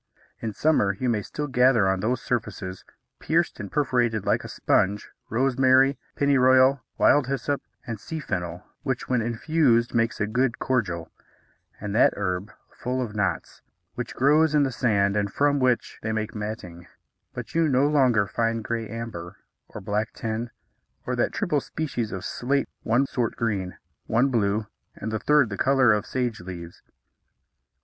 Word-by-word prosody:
In 115 - -3
summer 105 -6 +2
you 130 - 0
may 110 -3 +1
still 150 +7 -5
gather 125 -5 +4
on 95 0 +1
those 115 +5 -1
surfaces, 105 -6 -3 0.4
pierced - - 0
and 100 -2 -6
perforated 120 -7 +1
like - - +1
a - - -7
sponge, 100 +2 0 0.2
rosemary, 130 +2 +3 0.2
pennyroyal, 130 -1 +4 0.2
wild 145 -3 +4
hyssop, 140 +1 -1 0.2
and 115 -3 -5
sea 160 +9 -6
fennel 90 - -4 0.2
which 130 -3 -3
when 125 -2 +1
infused 120 +1 +2
makes 115 -1 +1
a 105 - +1
good 120 +3 0
cordial, 95 -11 -1 0.7
and 105 -1 -4
that 115 - +4
herb 95 0 -2 0.2
full 125 +1 -3
of 115 -4 -3
knots, 95 -5 -2 0.3
which 125 - -5
grows 150 +3 +4
in 145 - +5
the 135 - 0
sand 100 -5 +1
and 100 -1 0
from 145 +3 +2
which 130 -2 0
they 110 - -2
make 110 0 -2
matting; 105 -6 -6 0.5
but - - -7
you 165 -1 +3
no 135 -1 +3
longer 130 -8 +3
find 115 +3 -1
gray 115 -1 -3
amber, 110 -6 -7 0.3
or - - -9
black 105 +3 -2
tin, 115 +1 -3 0.6
or - - -1
that - - +1
triple - - 0
species 125 -8 -3
of 95 - -5
slate 140 +3 -1
one 120 +5 +2
sort 120 -4 -2
green, 100 -6 -2 0.3
one 120 +5 +3
blue, 105 -3 +1 0.3
and 110 - -5
the 110 - -1
third 145 0 +3
the 100 - -5
colour 130 -4 +4
of 105 -1 -1
sage 125 -4 -2
leaves. 85 -2 -9
115 Hz, 160 wpm, -25 LUFS, 105-130 Hz, 0.7 s, in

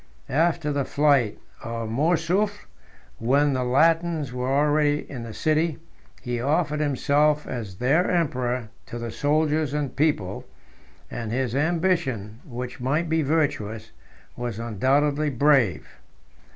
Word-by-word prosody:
After 160 +1 +1
the 140 -1 0
flight 140 -7 +2 0.3
of 115 -1 -4
Mourzoufle, 170 - 0 0.5
when 140 +5 +2
the 130 -1 0
Latins 160 +2 +2
were 125 +1 -2
already 145 +1 +2
in 130 -4 -7
the 115 -1 -7
city, 155 +5 0 0.5
he 120 -1 -2
offered 150 +2 +1
himself 150 +1 +2
as 110 -6 -5
their 140 - +2
emperor 125 -8 -1 0.2
to 120 - -6
the 115 -1 -5
soldiers 150 +1 +1
and 145 -4 -2
people; 145 - 0 0.7
and 115 -2 -4
his 125 -1 -1
ambition, 145 - 0
which 125 -2 -7
might 150 +6 0
be 160 0 +2
virtuous, 135 -8 -1 0.4
was 120 -3 -4
undoubtedly 140 +7 +1
brave. 135 - +2
140 Hz, 125 wpm, -24 LUFS, 120-155 Hz, 0.7 s, flight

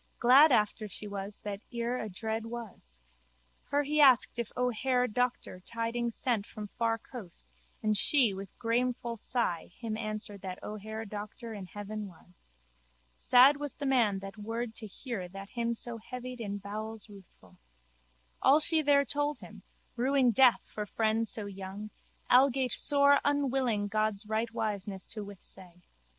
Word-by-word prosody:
Glad 270 +6 +7
after 215 -1 +2
she 210 +1 -7
was 200 0 -6
that 205 -1 -5
ere 240 +1 -2
adread 220 +2 -4
was. 215 - -9 0.7
Her 285 +1 +1
he 300 +1 +2
asked 255 -3 +5
if 235 - -3
O'Hare 250 +1 +1
Doctor 245 -4 -2
tidings 230 +3 -3
sent 230 -5 0
from 210 -1 -8
far 230 +1 0
coast 180 - -11 0.3
and 215 0 +2
she 240 0 +5
with 195 0 -7
grameful 240 0 -1
sigh 225 -7 -2
him 225 -2 -4
answered 215 -2 -5
that 185 -1 -5
O'Hare 220 +1 -6
Doctor 215 +2 -7
in 195 -3 -7
heaven 205 +2 -6
was. 175 - -19 0.7
Sad 260 +3 +6
was 290 -1 -4
the 285 - -5
man 240 -7 +3
that 195 +2 -8
word 225 +2 -4
to 220 -1 -4
hear 210 -3 -6
that 195 +2 -10
him 235 -1 -1
so 235 0 -4
heavied 250 +2 -7
in 205 -2 -3
bowels 215 +2 -6
ruthful. 200 -4 -17 0.8
All 275 +3 +6
she 315 0 +3
there 280 -1 +4
told 290 +2 -1
him, - - -12 0.3
ruing 260 0 +3
death 250 +2 +5
for 210 -1 -6
friend 225 +2 0
so 215 -1 -1
young, 195 +1 -7 0.4
algate 260 0 +4
sore 285 -1 +5
unwilling 265 -7 +1
God's 215 0 -1
rightwiseness 215 -3 -2
to 215 -2 -5
withsay. 185 -3 -9
225 Hz, 150 wpm, -31 LUFS, 205-250 Hz, 0.8 s, Glad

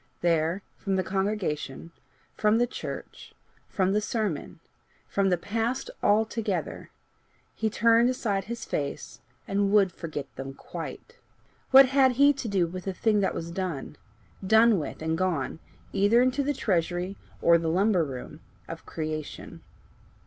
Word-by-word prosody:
There, 170 +2 +1
from 195 -1 -2
the 185 - +1
congregation, 185 -6 -2 0.4
from 215 +1 +2
the 240 - +3
church, 245 - -8 0.3
from 190 0 +1
the 210 - +2
sermon, 210 -9 -3 0.5
from 195 -1 +1
the 180 - +2
past 225 +7 -2
altogether, 220 +1 0 0.6
he 220 - -1
turned 230 +2 +4
aside 205 -7 -1
his 235 +2 -5
face 140 -1 -4 0.3
and 200 0 +1
would 200 -3 +4
forget 155 -4 -6
them 135 0 -6
quite. 470 - -8 0.5
What 270 +1 +9
had 265 -1 +4
he 285 +3 +5
to 270 -4 -5
do 195 -4 +2
with 180 +2 -7
the 195 - -2
thing 210 +2 +2
that 195 - 0
was 165 0 -5
done, 170 -6 -4 0.5
done 220 +1 +5
with, 150 +1 -6
and 160 0 0
gone, 165 -4 -1 0.3
either 205 +4 +4
into 255 +3 +2
the 285 +1 -1
treasury 180 -2 -1 0.2
or 170 0 +5
the 165 -1 -1
lumber 185 +1 +3
room, 130 -4 -7 0.3
of - - -9
creation? 155 -1 -5
195 Hz, 145 wpm, -27 LUFS, 170-225 Hz, 0.6 s, What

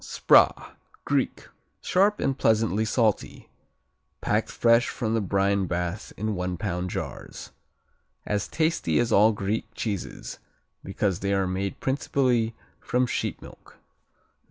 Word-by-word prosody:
Spra - - +3 0.3
Greek - - -1 0.3
Sharp 200 +3 +2
and 135 -1 0
pleasantly 110 -3 +2
salty, 110 -1 0 0.7
packed - - 0
fresh 115 0 +3
from 110 -2 -2
the 115 - +1
brine 100 0 +1
bath 90 +3 -3
in 110 +1 -2
one 90 -1 -3
pound 90 -1 -3
jars. - - -6 0.7
As 105 -1 -1
tasty 155 - 0
as 120 -1 +1
all 110 +2 +6
Greek 105 +1 -2
cheeses 100 -5 -5 0.4
because 95 -1 -1
they 100 0 0
are 95 -1 +1
made 95 +1 -3
principally 125 -4 0 0.2
from 125 +1 0
sheep 120 - -3
milk. - - -15
105 Hz, 125 wpm, -26 LUFS, 95-115 Hz, 0.7 s, all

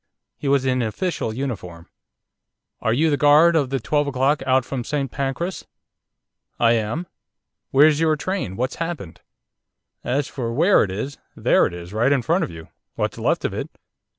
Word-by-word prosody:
He 145 - -6
was 135 -1 +2
in 130 -1 +1
official 120 - -2
uniform. 105 -10 -5 0.9
'Are 110 - +1
you 155 +7 +2
the 145 - +2
guard 150 +4 +6
of 145 -5 +2
the 135 0 -1
12.0 140 +2 +1
out 130 -1 +3
from 130 -3 -4
St 140 -1 -2
Pancras?' 140 +7 -3 0.9
'I 115 -1 +4
am.' 115 +10 -1 0.6
'Where's 150 +2 +5
your 160 -1 +3
train? 155 - -3
What's 125 +5 -2
happened?' 165 - -5 0.8
'As 135 +3 0
for 120 -4 -4
where 175 +10 +4
it 100 - -3
is, 110 +9 -5 0.2
there - - +3
it - - -8
is, 85 +2 -9
right 115 +5 +2
in 135 -3 +2
front 170 +10 +1
of - - -3
you, 80 -1 -11 0.3
what's - - -2
left - - 0
of - - -1
it. - - -4
135 Hz, 170 wpm, -22 LUFS, 115-150 Hz, 0.9 s, guard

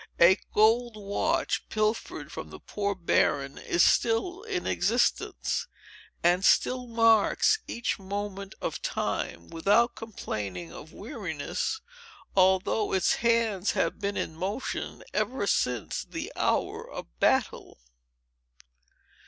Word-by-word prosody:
A 185 +3 +7
gold 225 +2 +3
watch, 200 -1 -1
pilfered 215 +1 -1
from - - -7
the - - -10
poor 200 -1 -2
Baron, 140 -5 +1
is 170 - +2
still 295 - +2
in 410 -5 -3
existence, - - 0 0.6
and 175 +2 +3
still 250 +5 +3
marks 230 - +4
each 235 -2 -2
moment 200 0 -5
of - - -3
time, 85 0 -3
without 205 +8 +3
complaining 100 - -5
of 155 +2 -10
weariness, 210 - -4 0.5
although 190 +3 +3
its 190 -2 +2
hands 230 -4 +2
have - - 0
been 200 0 -1
in 160 - -3
motion 195 +10 -4
ever 255 -5 0
since 125 - 0
the - - -6
hour - - 0
of - - -7
battle. - - +1
200 Hz, 110 wpm, -28 LUFS, 180-230 Hz, 0.6 s, A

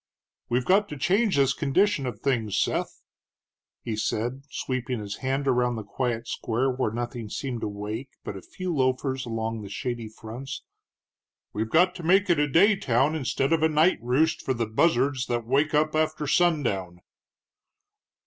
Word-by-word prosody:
"We've 125 +1 +1
got 200 +3 +3
to 150 - -6
change 200 +7 +2
this 135 -1 +3
condition 150 +1 +1
of 110 -5 -6
things, 115 -7 0
Seth," - - -1 0.8
he 115 -2 -3
said, 120 +5 -2
sweeping 130 -3 -3
his 100 -1 -5
hand 135 +1 -1
around 125 -2 +2
the 110 - -5
quiet 115 +2 -3
square, 120 +5 -1
where 125 -3 -1
nothing 120 0 -5
seemed 125 0 -4
awake 105 +5 -4
but - - -5
a 95 - -7
few 185 - -5
loafers 130 -1 0
along 115 -1 -3
the 100 - -8
shady 120 +2 -4
fronts: 115 +5 -8 0.9
"we've 110 +1 -2
got 180 +7 +4
to 180 - -8
make 190 +3 +3
it 165 - +3
a 150 - +3
day 195 +9 +5
town 135 -3 +1
instead 135 -1 0
of 165 - +2
a 160 - +4
night 155 +4 +3
roost 130 +7 +1
for 130 - -1
the 115 -1 -1
buzzards 130 +2 +1
that 120 -1 -1
wake 145 +5 +2
up 155 +1 +2
after 155 -1 0
sundown." 120 - +1
130 Hz, 170 wpm, -26 LUFS, 115-155 Hz, 0.9 s, day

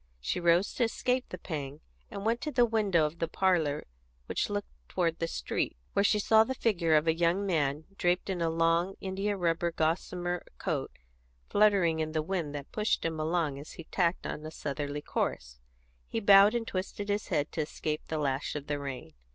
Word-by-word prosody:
She - - -2
rose 170 +2 +3
to 250 - +1
escape 250 +2 0
the 180 - -6
pang, 145 -4 -5 0.3
and 200 - -6
went 230 +2 +1
to 300 - -3
the 245 -2 +4
window 205 -8 +2
of 155 +2 -4
the 165 - 0
parlour 165 -5 +1 0.4
which - - -1
looked - - -3 0.2
toward 165 -2 0
the 165 - 0
street, - - -2 0.2
where 200 - +3
she 210 - +4
saw 220 +1 +5
the 260 +4 -3
figure 175 -10 +2
of 155 +1 +4
a 160 - +5
young 170 +4 +1
man 150 -5 0 0.2
draped 175 0 +1
in 185 -3 -2
a 165 - +2
long 165 +3 +2
indiarubber 190 -3 0
gossamer 175 +2 -1
coat - - -2 0.6
fluttering 195 -6 +4
in 155 0 -2
the 155 -1 0
wind 165 -4 -2
that 145 -1 -7
pushed 210 -4 0
him 160 -1 -2
along 155 -3 0
as 145 - -10
he 165 - -9
tacked 175 +1 0
on 150 - -4
a 155 - -5
southerly 145 -1 -4
course; 60 0 -3 0.5
he 225 - -2
bowed 200 +1 +7
and 230 -1 -1
twisted 195 +2 -4
his 205 +1 -1
head 145 0 0
to 160 - -1
escape 155 0 -3
the 160 - -2
lash 140 -1 -1
of 145 -1 -4
the 145 -1 -2
rain. 130 - -6
170 Hz, 195 wpm, -30 LUFS, 155-195 Hz, 0.6 s, bowed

